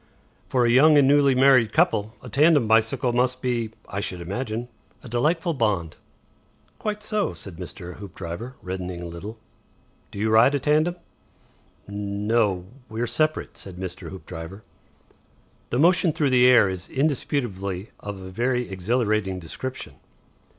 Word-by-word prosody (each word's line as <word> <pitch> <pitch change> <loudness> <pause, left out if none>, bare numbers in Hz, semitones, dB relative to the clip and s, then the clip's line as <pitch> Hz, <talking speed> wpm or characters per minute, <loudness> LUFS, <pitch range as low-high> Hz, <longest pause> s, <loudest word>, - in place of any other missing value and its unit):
"For 125 -2 +2
a - - +3
young 150 +5 +6
and 140 -2 +5
newly 140 -1 +4
married 130 -4 +5
couple, 110 - +2
a - - -8
tandem 150 -4 +4
bicycle 115 +3 +2
must 125 +1 +1
be, 120 -3 -1 0.2
I 100 - -4
should 95 -3 -3
imagine, 110 +6 -4 0.4
a - - -9
delightful 160 +9 0
bond." 100 - -1 0.8
"Quite 210 -1 -3
so," 215 - -1
said 85 0 -9
Mr. 90 -1 -8
Hoopdriver, 95 +5 -7
reddening 90 -1 -5
a - - -6
little. 95 +7 -8 0.7
"Do - - -11
you 110 +2 0
ride 115 +6 +5
a - - +1
tandem?" 155 +5 +2 0.9
"No 100 -1 0 0.2
we're 115 +2 -2
separate," 155 +6 -1
said 95 -2 -8
Mr. 90 -1 -6
Hoopdriver. 95 +1 -9 1.1
"The 120 - -1
motion 175 +2 +4
through 145 -3 +1
the 125 0 +6
air 120 -5 +6
is 95 -1 -5
indisputably 115 - -2
of 100 -1 -7
a 95 0 -9
very 125 +4 0
exhilarating 105 0 0
description." 90 - -7
115 Hz, 145 wpm, -24 LUFS, 95-135 Hz, 1.1 s, young